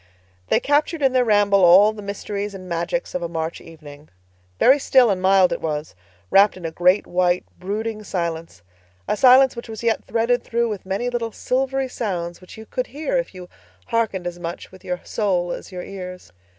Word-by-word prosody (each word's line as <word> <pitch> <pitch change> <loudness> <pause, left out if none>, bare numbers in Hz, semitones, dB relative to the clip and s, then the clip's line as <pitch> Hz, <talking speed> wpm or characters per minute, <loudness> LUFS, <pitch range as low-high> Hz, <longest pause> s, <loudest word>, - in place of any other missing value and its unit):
They - - +3
captured 295 +2 0
in 265 -1 +3
their 255 -1 +4
ramble 205 -3 +3
all 195 +5 +7
the 215 - -9
mysteries 200 0 -5
and 185 -1 -10
magics 170 +9 -3
of 180 - -2
a 170 - -3
March 165 0 -4
evening. 150 -2 -14 0.5
Very 270 +3 +5
still 255 -4 +4
and 185 -2 -2
mild 190 -1 +4
it - - -5
was, 150 -1 -3 0.4
wrapped 195 0 +5
in 180 - -9
a 165 - -3
great, 180 +4 +2
white, 180 0 +1
brooding 215 +3 -4
silence—a 90 - -6
silence 255 +3 +6
which 235 0 -8
was 220 0 -7
yet 230 -1 +1
threaded 230 +2 0
through 235 0 -1
with 205 -3 -6
many 220 +6 -2
little 235 -2 -2
silvery 265 +3 -1
sounds 175 -8 -4
which 185 - -13
you 220 - -10
could 255 +3 -3
hear 310 - -3
if - - -5
you 180 -1 -9 0.4
hearkened 225 -6 -1
as 175 0 -5
much 170 0 -7
with 185 - -16
your 180 0 -4
soul 180 -5 -1
as - - -7
your 180 -1 -6
ears. 180 - -9
195 Hz, 190 wpm, -22 LUFS, 175-230 Hz, 0.5 s, all